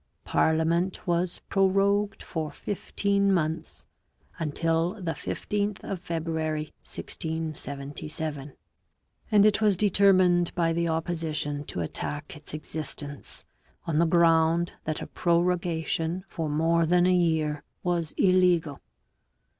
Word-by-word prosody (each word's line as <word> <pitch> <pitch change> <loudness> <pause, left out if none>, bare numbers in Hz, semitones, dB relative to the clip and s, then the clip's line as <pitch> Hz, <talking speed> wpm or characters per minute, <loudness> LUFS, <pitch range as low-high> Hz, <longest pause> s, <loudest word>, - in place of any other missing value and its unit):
Parliament 165 +3 +1
was 175 0 0
prorogued 200 +1 +2
for 160 -2 -3
fifteen 200 +4 0
months 160 -3 -2 0.5
until 165 +3 0
the 180 -6 -3
15th 205 +4 -3
of 195 - -4
February 160 -2 -3
1677, 150 -2 -4 0.8
and 210 -2 +6
it 215 0 +3
was 205 -4 +4
determined 185 -3 +4
by 165 -2 +2
the 170 0 0
opposition 160 -3 -2
to 90 - -5
attack 150 - -5
its 150 0 -9
existence 150 -2 -5 0.4
on 160 -2 0
the 170 - +4
ground 165 0 +4
that 155 -1 -2
a - - -5
prorogation 170 0 0
for 165 -5 -3
more 165 +2 +2
than 175 +1 +4
a 185 - +4
year 160 -4 +1 0.2
was 170 -3 0
illegal. 180 -6 +3
165 Hz, 110 wpm, -27 LUFS, 155-180 Hz, 0.8 s, and